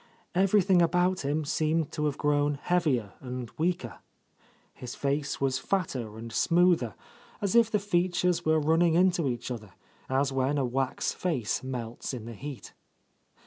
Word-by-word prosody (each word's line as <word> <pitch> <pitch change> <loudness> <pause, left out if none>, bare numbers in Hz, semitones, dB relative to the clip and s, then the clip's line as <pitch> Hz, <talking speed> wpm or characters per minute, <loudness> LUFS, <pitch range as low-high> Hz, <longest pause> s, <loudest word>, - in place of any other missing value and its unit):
Everything 190 -1 +4
about 180 +2 +2
him 145 +2 -1
seemed 155 +1 0
to 150 -1 -2
have 145 -2 -1
grown 145 0 +1
heavier 140 - 0
and 125 -2 -6
weaker. 175 +2 -1 0.7
His 125 -1 -8
face 140 +1 -1
was 130 -1 +1
fatter 130 - -2
and 115 0 -8
smoother; 170 - +3 0.4
as 200 -1 -1
if 230 -2 +6
the 215 - +2
fea 185 -3 +1
tures 180 0 0
were 155 0 +3
running 160 +2 +3
into 175 -4 +3
each 120 +1 -4
other, 105 -6 -7 0.4
as 135 +1 +1
when 135 +2 +1
a 135 - +1
wax 130 +1 -1
face 140 - -1
melts 125 -1 -5
in 115 -3 -7
the 115 - -7
heat. 135 +4 -8
145 Hz, 155 wpm, -28 LUFS, 130-175 Hz, 0.7 s, if